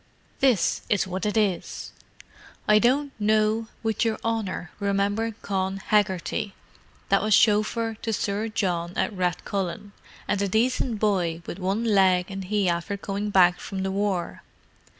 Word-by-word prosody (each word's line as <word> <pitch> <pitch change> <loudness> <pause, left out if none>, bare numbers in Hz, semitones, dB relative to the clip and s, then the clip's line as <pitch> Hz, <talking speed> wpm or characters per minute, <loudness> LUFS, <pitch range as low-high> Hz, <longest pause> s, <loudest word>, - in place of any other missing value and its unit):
"This 255 -8 +2
is 205 -2 +2
what 185 +1 -3
it 210 - -1
is. 200 -5 -1 0.8
'I 210 0 +6
don't 275 +5 +2
know 215 +1 +2 0.2
would 220 0 0
your 225 -2 0
honour 210 -6 -2
remember 205 +2 0
Con 190 -1 -1
Hegarty, 200 0 0 0.5
that 195 - +4
was 215 -1 +4
shofer 225 +2 +2
to 225 - -2
Sir 205 +1 -1
John 180 -5 -1
at - - 0
Rathcullen, 190 +2 -2 0.4
and 200 - 0
a 200 - +1
decent 230 +3 +1
boy 175 -6 0
with 180 - -6
one 195 +4 -1
leg 190 -4 +3
and 195 -1 -5
he 205 0 +1
after 170 +4 -1
coming 200 +1 -3
back 180 -3 +5
from 190 -1 -5
the 190 - -1
war. 195 -3 -2
200 Hz, 150 wpm, -25 LUFS, 190-215 Hz, 0.8 s, I